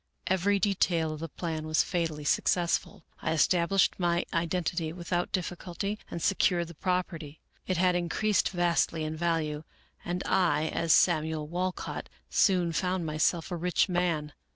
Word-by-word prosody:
" - - -48
Every 190 +2 +2
detail 175 -5 +1
of 155 - -7
the 165 +1 -5
plan 160 -1 -4
was 155 0 +3
fatally 165 -4 -2
successful. 170 +3 0 0.2
I - - 0
estab 170 +2 +3
lished 195 0 +2
my 175 -1 +1
identity 170 -1 -1
without 175 +1 -2
difficulty 185 +3 -3
and 170 - -5
secured 175 -3 +2
the - - -9
property. 170 -3 -3 0.3
It 185 - 0
had 180 0 +3
increased 175 +3 +1
vastly 170 -2 +1
in 155 0 -3
value, 160 -2 -1 0.4
and 180 +1 -3
I, 160 -4 +2
as 165 - 0
Samuel 155 -3 +3
Walcott, 180 +3 -3 0.2
soon 180 -4 +3
found 180 +1 -1
myself 155 +2 0
a - - -1
rich 175 +3 +1
man. 170 -5 0
170 Hz, 155 wpm, -29 LUFS, 160-180 Hz, 0.4 s, was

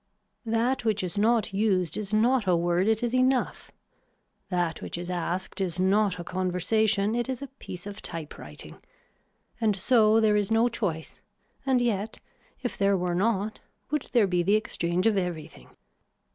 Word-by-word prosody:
That 235 +3 +1
which 215 -4 0
is 180 +1 -4
not 215 0 +2
used 195 -4 +1
is 210 -1 -4
not 225 +1 +2
a 180 - +4
word 175 +3 +1
it 220 +1 +2
is 240 0 -1
enough. 255 0 +1 0.8
That 175 -3 -1
which - - -5
is 175 +1 -5
asked 180 +3 -3
is 180 -2 -2
not 195 +1 +2
a 175 - -6
conversation, 200 +4 +1
it 240 +2 -1
is 260 +1 -3
a - - -5
piece 180 0 -8
of 205 +1 -8
typewriting. 150 - -7 0.8
And 220 -3 +2
so 220 +2 +4
there 215 -1 +3
is 205 -2 +1
no 225 +1 +4
choice 175 -9 -4 0.5
and 260 -2 +3
yet 215 -2 -2 0.4
if 245 - -4
there 200 -1 +3
were 180 -1 -1
not 205 +2 0 0.3
would 300 -2 -2
there 235 -4 +4
be 180 -2 +1
the 195 +4 +3
exchange 180 -4 -1
of 220 -3 +3
everything. 170 -4 -4
205 Hz, 165 wpm, -27 LUFS, 180-225 Hz, 0.8 s, a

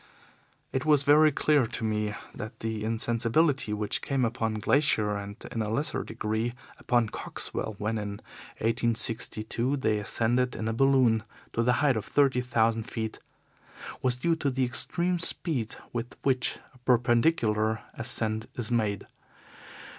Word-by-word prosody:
"It 130 - 0
is 150 -3 +4
very 150 +2 +6
clear 145 -3 +2
to 120 +1 -4
me 105 -1 -1 0.2
that 110 - -8
the 110 -1 -3
insensibility 115 +4 +1
which 105 0 -1
came 135 -3 0
upon 115 -1 -1
Glaisher, 110 -1 +2
and 100 0 -6 0.2
in 115 - -2
a 105 - -2
lesser 130 +8 -1
degree 110 +3 -2 0.2
upon 120 -3 +1
Coxwell, 110 - -3
when, 110 +2 -2
in 105 -1 -4 0.5
1862, 115 +2 0
they 110 -5 +1
ascended 120 +4 +1
in 110 - -3
a 110 - 0
balloon 130 -3 +4 0.3
to 115 - +1
the 125 +1 +3
height 135 -5 +3
of 105 - -3
thirty 135 -3 +2
thousand 115 -2 +1
feet, 110 -1 -4 0.8
was 125 -1 +2
due 165 +6 +1
to 145 -3 0
the 130 0 0
extreme 175 +8 +1
speed 140 -8 -1 0.2
with 120 0 -4
which 130 -2 +2 0.2
a 125 - -21
perpendicular 120 -3 +2
ascent 110 -3 0
is 120 -2 -2
made. 105 -4 0
115 Hz, 145 wpm, -28 LUFS, 110-130 Hz, 0.8 s, very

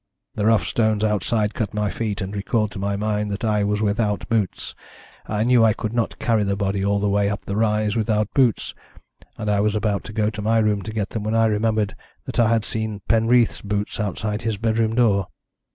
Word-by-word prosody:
The 105 0 0
rough 115 -1 +3
stones 110 -2 +1
outside 105 0 0
cut 105 -2 -3
my 105 -2 0
feet, 105 0 -3
and 95 +2 -4
recalled 105 +1 0
to 100 - -7
my 100 +1 -1
mind 105 0 -1
that 100 +3 -4
I 105 -2 +1
was 105 +1 0
without 105 0 0
boots. 110 -5 -1 0.5
I 105 0 0
knew 120 -1 +4
I 110 -1 +5
could 110 +1 -4
not 120 -1 -1
carry 110 -3 +1
the 100 0 0
body 100 -1 -1
all 100 0 +1
the 105 - 0
way 100 0 +2
up 105 -1 -4
the 100 - -3
rise 105 -1 +1
without 105 -2 0
boots, 125 -6 +2 0.6
and 105 - -5
I 105 -1 +2
was 105 +1 +1
about 105 -1 0
to - - -7
go 105 0 +1
to 105 -1 -6
my 110 +2 +2
room 105 -2 +2
to 110 - -6
get 105 -2 -2
them 110 - -3
when 110 +2 -1
I 115 0 +4
remembered 110 -1 0 0.3
that - - -4
I 115 -2 +4
had 115 -1 +1
seen 110 -2 -3
Penreath's 115 +2 +3
boots 105 +1 -3
outside 105 +1 -2
his 110 -2 -2
bedroom 110 +1 0
door. 105 -6 +3
105 Hz, 220 wpm, -22 LUFS, 105-110 Hz, 0.6 s, I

